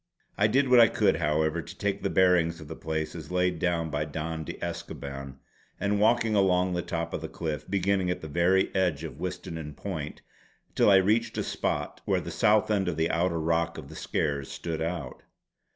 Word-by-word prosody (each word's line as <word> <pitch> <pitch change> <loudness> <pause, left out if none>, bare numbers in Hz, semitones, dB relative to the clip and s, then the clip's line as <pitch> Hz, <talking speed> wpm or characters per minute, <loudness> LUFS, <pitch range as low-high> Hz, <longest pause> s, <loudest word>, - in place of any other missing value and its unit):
I 105 - +3
did 135 +5 +2
what 125 -1 +7
I 115 - +9
could, 80 - +2
however, 80 +1 +1
to 85 +4 -11
take 100 -1 -1
the 100 - 0
bearings 90 -3 +3
of 80 - -10
the - - -7
place 80 -1 -3
as - - -8
laid 90 -1 +1
down 85 -2 0
by 75 0 0
Don 80 +1 -4
de - - -5
Escoban 70 -1 -6 0.4
by 100 - 0
walking 110 +2 +3
along 90 -2 +3
the 90 - 0
top 85 -1 -4
of - - -3
the - - -4
cliff, 80 -1 -5
beginning 95 -1 +1
at 90 - -2
the 80 - -6
very 85 +5 +2
edge 90 -6 +1
of 80 - -7
Witsennan 80 -5 -5
Point 80 -5 -6 0.5
till - - +4
I 100 - +7
reached 105 +5 +2
a - - 0
spot - - -2
where - - +2
the - - -6
south 105 +1 +3
end 100 -3 +1
of 85 -3 -1
the 80 +1 +1
outer 85 0 +1
rock 85 +1 0
of 70 -3 -9
the 80 - -10
Skares 70 -4 -2
stood 80 -2 -4
out. 80 -6 -4
85 Hz, 205 wpm, -28 LUFS, 80-95 Hz, 0.5 s, I